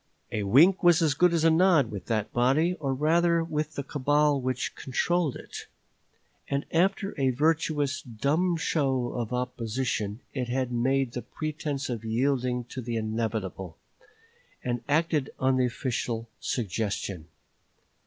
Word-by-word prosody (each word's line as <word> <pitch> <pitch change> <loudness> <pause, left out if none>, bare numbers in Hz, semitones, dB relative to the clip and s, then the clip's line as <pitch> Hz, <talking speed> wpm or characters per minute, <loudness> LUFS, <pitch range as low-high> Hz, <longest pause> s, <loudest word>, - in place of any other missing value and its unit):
A 105 - -1
wink 150 - +5
was 175 -2 +6
as 155 -3 +3
good 175 +5 +4
as 165 -2 +1
a 165 - +5
nod 160 -7 +4
with 100 -4 -7
that 110 -2 -1
body, 135 +8 +3
or 140 -3 -1
rather 165 +4 +2
with 155 -1 -3
the 140 - -3
cabal 145 +1 +2
which 130 0 -2
controlled 160 +3 0
it; - - -9 0.8
and 140 +1 -1
after 195 +4 +1
a 135 - +3
virtuous 150 0 +1
dumb 145 +10 0
show 135 -6 0
of 120 -2 -3
opposition, 125 -3 -2
it 125 -1 -2
made 130 +1 0
a 125 - -2
pretense 150 -2 -4
of 115 -3 -4
yielding 125 +2 0
to 130 +2 -7
the 120 -1 -4
inevitable, 110 -5 -3 0.9
and 120 -1 -2
acted 155 -2 +1
on 130 0 +2
the 125 -1 +3
official 115 -2 -3
suggestion. 100 -6 -3
130 Hz, 140 wpm, -27 LUFS, 120-155 Hz, 0.9 s, was